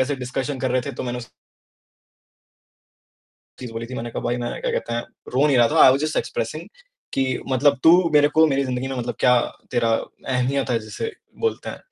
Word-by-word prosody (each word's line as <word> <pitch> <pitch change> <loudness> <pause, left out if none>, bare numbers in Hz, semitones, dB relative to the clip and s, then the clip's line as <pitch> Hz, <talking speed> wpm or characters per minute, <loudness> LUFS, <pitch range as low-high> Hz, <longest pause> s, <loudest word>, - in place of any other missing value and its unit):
ऐसे 140 +2 +1
डिस्कशन 130 +2 -3
कर 130 -2 0
रहे 130 0 +2
थे 140 - -3
तो - - -5
मैंने 125 -1 -3
उस 120 - -8 2.3
चीज़ 125 -3 -7
बोली 115 +1 -5
थी, 130 - -8
मैंने 120 -1 -5
कहा - - -5
भाई 120 +1 -1
मैंने 120 0 -4
क्या - - -1
कहते 120 - -3
हैं, 120 - 0 0.3
रो 140 +4 +4
नहीं 140 - +3
रहा 120 -1 +5
था, - - +4
आई - - +9
वॉज़ 135 +2 -1
जस्ट 155 - -2
एक्सप्रेसिंग - - -3 0.5
कि 135 - +1 0.2
मतलब 140 +1 +3
तू 160 - +9 0.2
मेरे 145 0 +6
को 160 +1 +4
मेरी 140 -2 +1
जिंदगी 130 0 -3
में 135 - -4
मतलब 120 0 -3
क्या 125 0 +5 0.3
तेरा 115 -1 +1 0.4
अहमियत 130 +1 0
है 115 - +2
जिसे 115 - -5 0.3
बोलते 455 -1 -1
हैं। - - -9
130 Hz, 210 wpm, -22 LUFS, 120-140 Hz, 2.3 s, आई